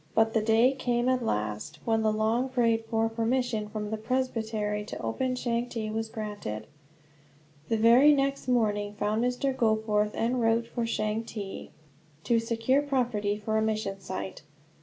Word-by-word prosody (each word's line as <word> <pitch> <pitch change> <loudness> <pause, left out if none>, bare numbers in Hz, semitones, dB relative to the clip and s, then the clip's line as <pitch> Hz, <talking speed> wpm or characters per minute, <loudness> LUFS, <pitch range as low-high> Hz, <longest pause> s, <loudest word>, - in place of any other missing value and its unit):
But 225 0 +3
the 225 - +3
day 225 +4 +4
came, 245 -2 0
at 255 -1 +2
last, 105 - -2
when 225 -1 +2
the 215 0 +2
long 220 +4 +1
prayed 230 -3 +1
for 225 0 +1
permission 225 -1 -1
from 210 0 -4
the 220 - -1
presbytery 220 -3 -1
to - - -6
open 255 - -1
Changte 235 -3 -2
was 225 0 -2
granted. 205 - -5 1.0
The 225 - +2
very 235 +7 +7
next 275 -1 0
morning 210 -4 +1
found 210 +2 0
Mr. 250 +2 0
Goforth 220 -2 +1
en 245 +2 0
route 230 0 +2
for 235 0 -3
Changte, 215 -2 -3 0.5
to 235 -1 +3
secure 230 +4 +1
property 240 -7 0
for 220 +1 -1
a - - +1
mission 215 -3 -1
site. 190 0 -6
225 Hz, 155 wpm, -28 LUFS, 215-245 Hz, 1.0 s, very